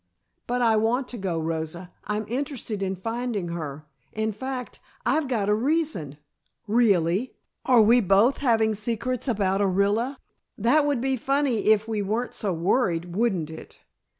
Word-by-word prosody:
"But 245 0 0
I 225 -2 +4
want 240 +4 +1
to 245 - -6
go, 180 -4 -2
Rosa. 160 +2 -4
I'm 210 +1 -2
interested 245 -4 -4
in 190 0 -1
finding 225 -1 -3
her. 155 -3 -6 0.3
In 220 0 -1
fact, 255 +3 -6 0.3
I've 310 -2 +1
got 225 -6 -1
a 210 - +3
reason 240 - 0 0.3
" - - -48 0.2
"Really! 190 +5 +1 0.3
Are 245 -4 +6
we 235 +3 +5
both 200 +6 +4
having 225 -5 +2
secrets 235 +4 -2
about 200 -4 +1
Orilla? 205 +7 +1 0.4
That 285 +8 +3
would 280 -5 0
be 265 0 0
funny 270 -3 0
if 215 0 +4
we 220 -2 -1
weren't 220 +5 -2
so 205 - -1
worried, 175 -1 0
wouldn't 190 -8 0
it? 160 - -11
220 Hz, 155 wpm, -25 LUFS, 190-245 Hz, 0.4 s, Are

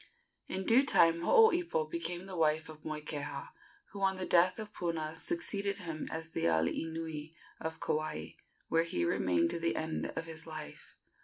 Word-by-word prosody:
In 190 0 -3
due 245 +4 +6
time 170 -10 +4
Hooipo 345 - +4
became 170 +3 -3
the 190 -1 -7
wife 160 -1 +2
of 155 -1 -11
Moikeha, 150 - -4 0.4
who, 200 - -7
on 190 0 +3
the 185 - -2
death 180 +3 +4
of 215 -1 -6
Puna, 160 -3 -2
succeeded 205 -13 -1
him 165 -5 -5
as 160 0 -4
the - - -1
alii 80 - +1
nui 160 -1 -5 0.2
of 160 0 -4
Kauai, 150 - -2 0.4
where 165 - +3
he 125 - 0
remained 85 -1 +2
to 170 - -3
the 165 0 0
end 160 0 -2
of 165 - -3
his 160 0 -7
life. 155 -1 -8
165 Hz, 170 wpm, -33 LUFS, 155-185 Hz, 0.4 s, due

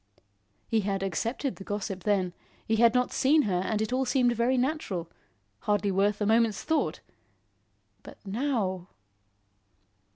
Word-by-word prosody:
He 225 - +2
had 195 -1 -1
accepted 230 - -2
the 195 - -9
gossip 195 -2 -4
then; 190 -4 +1 0.3
he 220 - +1
had 235 +1 +5
not 250 0 +2
seen 295 +3 +4
her 180 -4 0
and 215 +2 0
it 220 - -3
all 260 +1 +2
seemed 250 -1 +2
very 240 +3 +2
natural; 245 - -2 0.5
hardly 205 -1 0
worth 200 +2 +1
a 210 - 0
moment's 225 -1 +2
thought. 300 - 0 1.0
But - - -12
now! 200 -5 -1
215 Hz, 140 wpm, -28 LUFS, 195-250 Hz, 1.0 s, had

